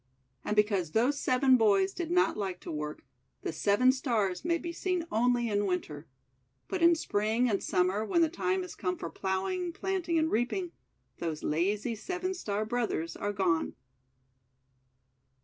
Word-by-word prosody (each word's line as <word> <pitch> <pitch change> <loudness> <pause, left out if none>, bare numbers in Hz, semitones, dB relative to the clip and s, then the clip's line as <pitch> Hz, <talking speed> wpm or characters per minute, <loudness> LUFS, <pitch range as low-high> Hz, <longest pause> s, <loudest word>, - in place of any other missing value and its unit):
And 210 - -1
because 200 -6 +2
those 260 +6 +2
seven 255 0 +4
boys 200 -4 +3
did 340 -2 -4
not 360 +1 +3
like 190 -3 -3
to - - -6
work, 150 -1 -5 0.4
the - - -3
Seven 205 +10 +4
Stars 230 -8 -1
may 340 0 +1
be 340 0 -6
seen 360 -1 -1
only 240 +1 +2
in 205 -1 0
Winter. 160 -5 -3 0.6
But 375 - -3
in 335 0 +6
Spring 220 -3 +1
and 205 -4 0
Summer, 185 +4 +1
when 335 +10 +2
the - - +4
time 365 +3 -1
is 360 - -8
come 180 -1 -2
for 165 - -6
ploughing, 200 - -2
planting, 355 -1 -1
and 320 0 +1
reap 240 +3 +1
ing, 360 -3 -3 0.5
those 160 -2 -3
lazy 200 +9 0
Seven 365 - -3
Star 215 - -2
Brothers 220 -8 -2
are 205 - -2
gone. 185 -5 0
220 Hz, 165 wpm, -30 LUFS, -, 0.6 s, in